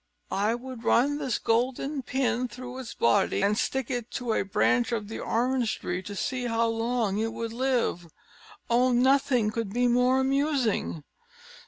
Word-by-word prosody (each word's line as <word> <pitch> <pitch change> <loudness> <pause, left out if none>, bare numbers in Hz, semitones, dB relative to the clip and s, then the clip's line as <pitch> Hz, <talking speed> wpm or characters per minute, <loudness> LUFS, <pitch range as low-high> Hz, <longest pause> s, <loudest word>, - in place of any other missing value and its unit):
"I 210 +4 +1
would 250 -1 -8
run 285 +6 +3
this 265 -5 -1
golden 260 +5 0
pin 255 -1 0
through 250 +1 -8
its 250 -3 -7
body, 115 +10 +2
and 205 +1 +3
stick 260 +2 -1
it 245 -2 -3
to 240 -2 -1
a - - +1
branch 240 +5 +1
of 215 -3 -3
the 225 - -5
orange 245 0 0
tree, 180 +1 -3
to 205 +2 -8
see 255 +4 -2
how 230 0 +1
long 225 -3 0
it 225 0 -1
would 230 -1 -4
live. 245 -8 0 0.6
Oh, 250 +2 +3
nothing 250 -3 +3
could 225 -3 -3
be 245 +1 +2
more 250 +2 +3
amusing!" 265 - 0
240 Hz, 165 wpm, -27 LUFS, 225-255 Hz, 0.6 s, run